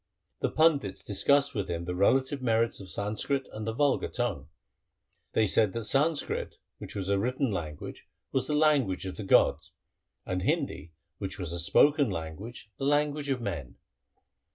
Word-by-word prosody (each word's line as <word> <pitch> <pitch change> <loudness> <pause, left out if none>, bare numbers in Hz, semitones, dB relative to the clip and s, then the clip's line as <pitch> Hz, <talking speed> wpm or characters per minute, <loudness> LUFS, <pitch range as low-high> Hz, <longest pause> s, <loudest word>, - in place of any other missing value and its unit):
2 - - +2
The - - -8
pandits 145 -12 +2
discussed 140 +8 +2
with 100 -3 -3
him 85 0 -3
the 90 - -3
relative 130 +9 +2
merits 115 -1 +1
of 95 -2 -9
Sanskrit 110 +8 -2
and 110 0 -5
the - - 0
vulgar 140 +4 +1
tongue. 100 - -3 0.8
They 110 - +3
said 105 0 +3
that 115 - -3
Sanskrit, 145 +7 0 0.2
which - - -9
was 95 -2 -3
a 100 0 +2
written 125 +3 0
language, 80 -6 -6 0.2
was 130 -1 0
the 150 - 0
language 145 -12 +2
of 95 - -6
the 110 - -5
gods, 95 - +3 0.5
and 90 0 -2
Hindi, 80 -2 -2 0.3
which 95 0 -5
was 85 -4 -3
a 85 - -3
spoken 145 - +4
language, 95 +7 -7
the 135 - -2
language 145 0 +1
of 130 -3 0
men. 85 - -5
110 Hz, 170 wpm, -29 LUFS, 95-140 Hz, 0.8 s, spoken